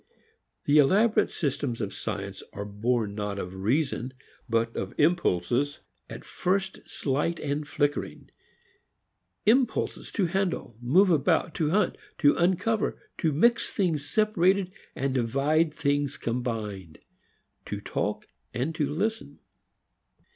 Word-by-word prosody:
The 145 +1 +5
elaborate 205 +10 +4
systems 140 -5 -2
of 100 -3 -3
science 100 -1 -5
are 100 - -5
born 105 +1 -1
not 105 -1 -3
of 90 -2 -5
reason 130 +5 -1 0.3
but 115 0 +1
of 95 - -4
impulses 145 - +2 0.3
at - - -8
first 190 +1 -1
slight 150 +5 -1
and 145 +1 -2
flickering; 145 -1 -2 1.1
impulses 240 +1 +2
to 200 - +1
handle, 180 - -1
move 180 +11 +4
about, 155 +1 +2
to 155 -2 0
hunt, 205 +6 +1 0.2
to 145 -2 +5
uncover, 190 +5 +1 0.2
to 160 - +2
mix 235 +11 +3
things 175 - 0
separated 195 -1 +2 0.2
and 135 0 -1
divide 140 +6 +2
things 145 -2 0
combined, 110 -8 -4 0.7
to - - -4
talk - - -3 0.3
and 135 +7 -1
to 150 -3 -1
listen. 215 +9 -2
145 Hz, 120 wpm, -27 LUFS, 120-180 Hz, 1.1 s, The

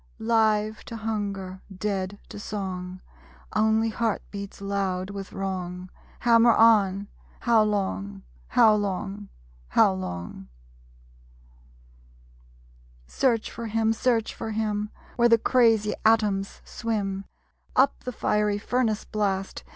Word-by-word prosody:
Live 220 -1 +1
to 230 - -7
hunger, 200 -4 -4
dead 195 0 -3
to - - -9
song. 185 -3 -5 0.5
Only 220 +1 +3
heart 225 -1 -1
beats 200 -1 -7
loud 195 -1 -2
with 195 -1 -7
wrong 185 -2 -4 0.3
Hammer 235 -1 +6
on, 205 -3 +4 0.3
How 230 -2 +4
long?... 100 - -2 0.2
How 215 - +5
long? 200 0 -3 0.4
How 80 - +4
long? 90 -7 -6 2.6
Search 230 - 0
for 230 0 -6
him; 225 0 +1
Search 230 -1 0
for 225 - -5
him; 210 -1 -1 0.3
Where 240 0 +5
the 230 - +6
crazy 225 -3 +3
atoms 210 -3 +2
swim 200 -4 -3 0.5
Up 270 +2 +4
the 250 - -3
fiery 210 -3 +1
furnace 225 0 0
blast. 195 -3 -2
210 Hz, 110 wpm, -26 LUFS, 195-225 Hz, 2.6 s, Hammer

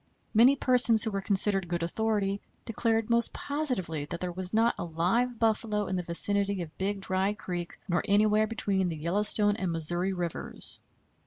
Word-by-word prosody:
Many 240 +5 +5
persons 250 -4 +6
who 220 - -2
were 195 -1 -3
considered 195 -1 +2
good 170 0 -3
authority 200 +1 -2 0.2
declared 225 0 -1
most 235 0 +2
positively 245 - -3
that 170 +3 -7
there 180 0 -4
was 180 +1 -3
not 225 +2 +2
a - - -3
live 190 +10 -1
buffalo 215 -2 -1
in 190 - -4
the 180 - -2
vicinity 200 +2 +2
of 155 -1 -13
Big 195 +1 -3
Dry 190 +1 -1
Creek, 175 -3 -7
nor 175 -2 0
anywhere 215 +1 +2
between 195 -4 -1
the 165 - -5
Yellowstone 205 +5 +3
and 185 -5 -3
Missouri 175 +3 -2
Rivers. 175 -3 -5
200 Hz, 170 wpm, -27 LUFS, 175-220 Hz, 0.2 s, persons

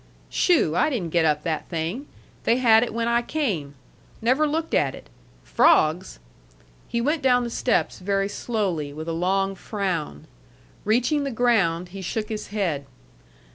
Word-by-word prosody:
"Shoo! 305 - +2
I 305 - +3
didn't 195 - -3
get 170 -1 +3
up 150 -1 +1
that 160 -3 -3
thing. 175 - -3 0.4
They 235 - +3
had 225 -3 +5
it 245 - -1
when 230 +1 -2
I 235 0 +2
came. 205 - -2 0.4
Never 260 +7 +2
looked 320 +2 -2
at 135 -2 +2
it. - - -15 0.3
Frogs?" 160 +5 +3 0.7
He 235 - -2
went 295 +6 0
down 250 -2 +3
the 235 - -4
steps 240 0 0
very 195 +1 0
slowly, 190 -10 -2
with 155 +2 -7
a 165 - -2
long 195 +3 0
frown. 185 - -4 0.6
Reaching 250 +7 +2
the 280 - -2
ground, 195 -9 +1
he 195 +1 -8
shook 210 +4 -3
his 215 -1 -5
head. 175 -10 -2
205 Hz, 160 wpm, -24 LUFS, 165-240 Hz, 0.7 s, had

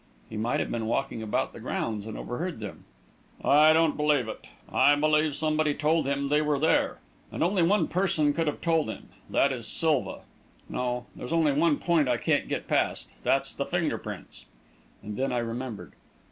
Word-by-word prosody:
"He - - -6
might 110 +3 0
have - - -2
been 115 -2 -2
walking 120 0 -1
about 110 -1 -1
the - - -10
grounds 110 -2 -3
and 110 - -6
overheard 165 +3 -4
them." 105 -2 -8 0.6
"I 150 +2 +6
don't 160 -1 +3
believe 150 -5 +2
it. 110 - -6 0.3
I 145 - +4
believe 150 0 +2
somebody 155 -1 +1
told 155 0 +1
him 140 0 -1
they 150 +1 +3
were 150 -1 +1
there. 160 +3 +2 0.3
And - - -1
only 180 +2 +2
one 175 0 +3
person 165 -5 +1
could 165 +1 -1
have 150 - -2
told 165 -6 +1
him - - -8 0.2
that 140 - +3
is 120 -4 -5
Silva. 155 -5 0 0.5
No 125 -1 -2
there's 125 - -7
only 165 -3 +3
one 150 +1 +2
point 165 -5 +2
I 120 - +2
can't - - 0
get - - -3
past - - 0
that's - - +1
the - - -2
finger - - -1
prints." - - -9 0.6
And 105 0 -6
then 135 +1 0
I 125 - 0
remembered. 120 -1 -4
145 Hz, 190 wpm, -27 LUFS, 120-155 Hz, 0.6 s, I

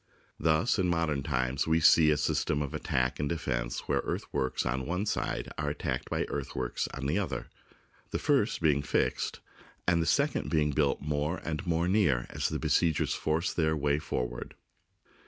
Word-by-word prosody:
Thus 80 +8 +2
in 95 - +2
modern 85 -5 +1
times 65 -1 -1
we 80 +1 +3
see 80 -1 +6
a 75 - +3
system 75 +1 0
of 70 - -6
attack 65 -1 -1
and 75 -1 -1
defence - - -2
where - - 0
earthworks 65 -1 -2
on 65 0 -1
one 90 +5 -1
side 105 - -2
are 75 -1 0
at 75 - -4
tacked - - -3
by - - 0
earthworks 60 -1 -3
upon 70 0 -6
the 75 +8 +1
other, 100 - -4 0.6
the - - -1
first - - +1
being 75 -3 +3
fixed 70 - -1 0.5
and 85 -1 +4
the 80 - -1
second 145 +1 +1
being 75 -2 +2
built 70 -1 +1
more 75 +3 -1
and 85 +4 -3
more 85 +1 +1
near 90 - +2
as - - -1
the - - -2
besiegers 80 -3 +2
force 80 +2 0
their 80 -2 +1
way 75 0 +1
forward. - - -4
75 Hz, 175 wpm, -30 LUFS, 70-85 Hz, 0.6 s, see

